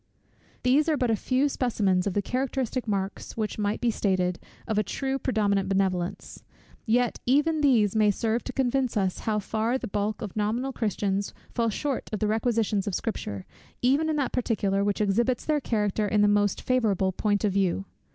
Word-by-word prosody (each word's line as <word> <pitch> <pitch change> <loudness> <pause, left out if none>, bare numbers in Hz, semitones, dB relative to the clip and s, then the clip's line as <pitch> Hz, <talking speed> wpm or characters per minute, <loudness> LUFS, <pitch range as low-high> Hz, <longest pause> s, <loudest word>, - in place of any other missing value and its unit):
These 280 +5 +3
are 305 - +2
but 250 -3 +1
a - - +3
few 255 +6 +1
specimens 205 -9 +1
of 195 - -2
the 205 - +1
characteristic 255 0 -2
marks 195 0 -3
which 215 -1 -2
might 205 0 0
be 240 -1 +2
stated, 185 -4 0 0.3
of 220 -2 +1
a - - +2
true 270 +6 -2
predominant 200 -6 +1
benevolence; 190 -2 -1 0.4
yet 240 +2 +2
even 295 +4 +3
these 225 -8 +3
may 215 -1 +4
serve 225 +3 0
to - - -4
convince 260 -2 0
us 190 -3 0
how 215 - +1
far 220 +4 0
the - - -5
bulk 205 +2 -2
of 205 - -6
nominal 230 +6 -1
Christians 200 -3 -1 0.2
fall 230 -1 +1
short 270 +4 -3
of 215 - -1
the 215 - -1
requisitions 220 -2 0
of 195 - -1
Scripture, 105 - -4 0.4
even 280 +6 +3
in 310 - +1
that 280 -3 0
particular, 205 -5 0
which 205 +1 0
exhibits 235 +5 +1
their 300 -2 +1
character 210 -3 0
in 210 0 +2
the - - +5
most 205 -1 +2
favourable 210 -7 +1
point 205 +2 0
of 205 -3 +1
view. 195 0 +1
215 Hz, 185 wpm, -27 LUFS, 200-250 Hz, 0.4 s, the